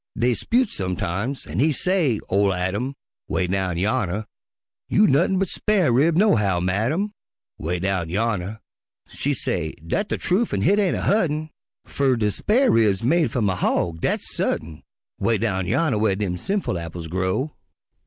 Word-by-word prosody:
Dey 120 +2 +2
'spute 240 - +1
sometimes 95 +7 -3
an' 80 +6 -4
he 155 +4 +4
say, 155 - +1
ol' 100 0 +2
Adam, 100 +10 -2 0.3
('Way 95 - 0
down 90 -1 -1
yonner) 105 +1 0 0.6
"You 210 - +5
nuttin' 170 +6 +3
but 190 0 +1
spar' 190 - +1
rib, 150 +7 +3
nohow, 105 - +3
madam," 115 - 0 0.5
('Way 85 +3 -2
down 95 -2 -1
yonner) 105 +1 -2 0.5
She 145 0 -1
say, 80 -9 -2
"Dat 200 - -1
de - - -1
trufe 205 +6 0
an' 95 - -1
hit 205 - +4
ain' 195 -3 +2
a - - -3
hu't'n', 155 -7 +1 0.3
Fer 135 -2 +1
de 105 -3 +1
spar' 245 - +2
rib's 105 -4 +3
made 160 +6 +3
f'um 115 -6 0
a 95 - +1
hawg, 85 -2 0
dat's - - -1
sut'n," 80 -1 -2 0.4
'Way 115 -1 +2
down 95 -4 -1
yonner 140 - +1
whar 105 -3 +2
dem 95 -3 -2
sinful 190 - -2
apples 85 0 -7
grow. 95 - -1
110 Hz, 165 wpm, -23 LUFS, -, 0.6 s, You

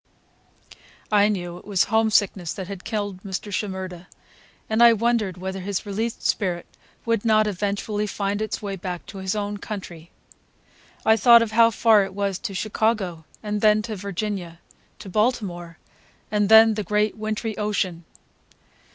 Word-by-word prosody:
I 205 -1 +5
knew 175 -4 -4
it - - -18
was 200 -3 +2
homesickness 210 -6 +1
that 190 -2 -6
had 195 -2 -8
killed 205 -4 -4
Mr. 200 +1 -5
Shimerda, 185 -3 -4 0.6
and 220 +1 +1
I 235 -1 +8
wondered 225 -4 0
whether 190 +1 -5
his 195 +2 -3
released 220 +3 -3
spirit 180 -4 0 0.4
would 230 -3 0
not 215 -2 +4
eventually 205 +1 -2
find 200 +1 -2
its 215 0 -3
way 200 -1 -3
back 180 -1 -6
to 195 - -9
his 190 +1 -2
own 205 0 -3
country. 180 -5 -8 1.0
I 220 - +6
thought 235 +1 +7
of 225 - -5
how 230 +1 +6
far 220 -2 +4
it 195 -1 -7
was 200 -2 -1
to 205 -5 -5
Chicago, 200 -4 -1 0.2
and 210 -1 -2
then 215 0 +4
to 220 -1 -5
Virginia, 195 -3 -4 0.4
to 210 - -11
Baltimore,—and 200 -1 -3
then 220 0 +8
the 210 0 -3
great 210 +2 0
wintry 215 0 -3
ocean. 190 -5 -1
205 Hz, 150 wpm, -23 LUFS, 190-215 Hz, 1.0 s, I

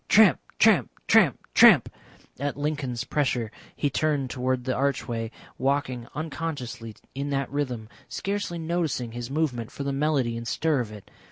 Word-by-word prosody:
Tramp, 210 -8 +7 0.2
tramp, - - +5 0.2
tramp, - - +5 0.2
tramp; - - +8 0.5
at 140 +1 -2
Lincoln's 145 -5 -2
pressure 125 -7 0 0.2
he 145 - 0
turned 145 -4 0
towards 130 0 -1
the 130 0 -1
archway, 125 -4 -1 0.3
walking 130 -3 0
unconsciously 145 -8 -5 0.2
in 140 +1 -3
that 140 -1 -1
rhythm, 125 -6 -2 0.2
scarcely 200 -3 -3
noticing 160 -7 -1
his 120 +1 -6
movement 135 -6 -1
for 140 - -5
the 140 0 -1
melody 135 -5 +1
and 115 0 -5
stir 155 +4 +1
of 115 -3 -3
it. 105 -2 -12
135 Hz, 150 wpm, -26 LUFS, 120-150 Hz, 0.5 s, tramp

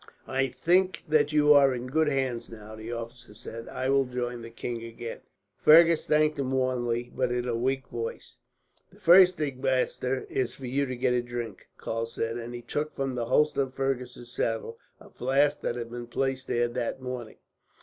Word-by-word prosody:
"I 135 0 +1
think 180 +7 +1
that 150 -1 +3
you 150 -1 +6
are 140 -2 +5
in 120 0 -5
good 155 +5 +1
hands 130 -4 -1
now," 110 -1 -10
the 110 +2 -7
officer 115 -1 -7
said. 115 +1 -8
"I 130 - -3
will 135 0 +3
join 125 -1 -4
the 115 - -8
king 115 0 -5
again." 115 0 -7 0.4
Fergus 165 +1 +6
thanked 155 0 +2
him 130 -1 -1
warmly, 120 -2 0
but 125 -1 0
in 125 0 -1
a 120 - 0
weak 130 +3 -1
voice. 120 +2 -6 0.5
"The 195 - -21
first 185 0 +7
thing, 140 -4 -3
master, 130 0 0
is 130 -1 -2
for 135 - -9
you 135 +3 0
to 130 - -4
get 125 0 +1
a 125 - +2
drink," 120 -4 -6
Karl 115 0 -3
said; 115 0 -3
and 120 +1 -6
he 120 - -8
took, 150 +5 -3
from 135 -1 -2
the 120 -2 -2
holster 150 +4 +2
of 130 -1 -3
Fergus's 125 -3 -3
saddle, 115 -1 -2 0.2
a - - -16
flask 140 +3 +1
that - - -2
he 120 - -3
had 120 0 -7
placed 135 +1 -1
there 120 0 +1
that 120 +1 -3
morning. 125 -3 -6
125 Hz, 195 wpm, -28 LUFS, 120-135 Hz, 0.5 s, first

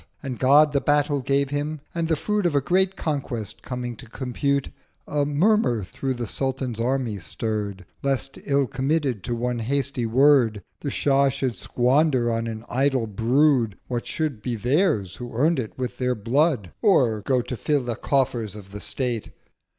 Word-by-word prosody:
And 130 -3 -5
God 145 +3 +5
the 140 - +2
Battle 145 -1 +2
gave 140 +1 +1
him; 145 +2 -2
and 170 -1 -1
the 160 - +2
Fruit 210 +4 0
Of 160 - -1
a - - +5
great 185 +6 +1
Conquest 135 -8 -3
coming 125 -2 -5
to 115 - -12
compute, 135 +2 -1 0.4
A 145 -1 0
Murmur 150 - +2
through 130 +7 -3
the 120 -1 -3
Sultan's 130 0 -3
Army 120 -3 -1
stirr'd 100 -1 -4 0.2
1010 140 - 0
Lest, 135 0 -3
ill 140 -1 +2
committed 135 - -1
to 120 - -1
one 120 0 -1
hasty 130 0 -1
Word, 120 -4 +4 0.2
The 145 - -3
Shah 140 0 +3
should 130 -3 -2
squander 125 - +2
on 115 0 -1
an 110 0 -6
idle 135 -2 +1
Brood 115 +1 +2
What 120 -2 -3
should 150 -9 -2
be 120 +1 -2
theirs 115 - +1
who 120 -2 -8
earn'd 155 +4 +3
it 110 -4 -5
with 125 -1 -4
their 125 -1 +1
Blood, 120 - +1
Or 125 - +3
go 125 +3 +1
to 125 +1 -5
fill 145 +4 0
the 120 -1 -2
Coffers 120 -5 0
of 100 -2 -11
the 105 - -7
State. 120 -5 -2
130 Hz, 175 wpm, -24 LUFS, 115-145 Hz, 0.4 s, God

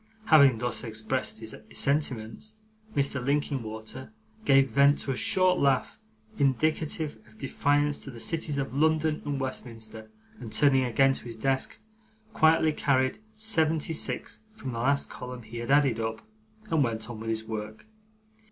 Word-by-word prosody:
Having 140 - +6
thus 120 +1 -2
expressed 110 +1 -2
his 110 -1 -7 0.2
sentiments, 140 - -1 0.4
Mr. 140 -2 0
Linkinwater 130 - -3 0.3
gave 135 -1 +5
vent 140 +1 +5
to 135 - -2
a - - -1
short 180 - +2
laugh, 135 - +1 0.4
indicative 150 0 0
of 110 0 -20
defiance 145 +2 +1
to - - -10
the 120 -3 -9
cities 155 +2 0
of 135 -2 -3
London 155 +1 +2
and 145 -2 -2
Westminster, 115 -4 -6 0.3
and, 115 -3 -8
turning 135 -1 +4
again 135 +3 +3
to - - -5
his 115 -1 -7
desk, 135 +3 -1 0.6
quietly 160 -2 +4
carried 130 0 +1 0.2
seventy 165 -8 +1
six - - -2 0.2
from 135 -11 -6
the 115 - -4
last 140 +4 +2
column 125 -1 -8
he 115 +2 -9
had 115 0 -5
added 140 -5 +4
up, 110 - -4 0.4
and 160 -3 +3
went 110 -3 -2
on 120 -3 -7
with 115 0 -5
his 110 0 0
work. 110 - -6
135 Hz, 150 wpm, -28 LUFS, 115-145 Hz, 0.6 s, Having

